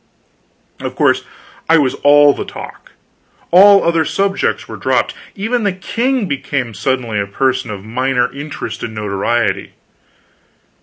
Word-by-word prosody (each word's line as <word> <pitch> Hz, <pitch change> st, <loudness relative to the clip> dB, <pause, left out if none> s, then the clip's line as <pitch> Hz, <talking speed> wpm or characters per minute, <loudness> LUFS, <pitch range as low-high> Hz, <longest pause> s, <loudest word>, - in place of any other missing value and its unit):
Of -, -, -5 dB
course -, -, +2 dB, 0.4 s
I 165 Hz, -, +6 dB
was 140 Hz, -4 st, +2 dB
all 145 Hz, 0 st, +5 dB
the -, -, -5 dB
talk -, -, -11 dB, 0.6 s
all 195 Hz, +3 st, +7 dB
other 165 Hz, -1 st, +2 dB
subjects 195 Hz, +4 st, -1 dB
were -, -, -7 dB
dropped; -, -, 0 dB, 0.2 s
even 225 Hz, +5 st, -1 dB
the 200 Hz, -, +1 dB
king 235 Hz, +6 st, -1 dB
became 135 Hz, -5 st, -3 dB
suddenly 120 Hz, 0 st, -1 dB
a 100 Hz, -, -2 dB
person 130 Hz, +3 st, -1 dB
of 100 Hz, -1 st, -7 dB
minor 125 Hz, +2 st, 0 dB
interest 145 Hz, +2 st, -6 dB
and 110 Hz, -, -6 dB
notoriety. 105 Hz, +3 st, -1 dB
140 Hz, 135 wpm, -16 LUFS, 120-185 Hz, 0.6 s, all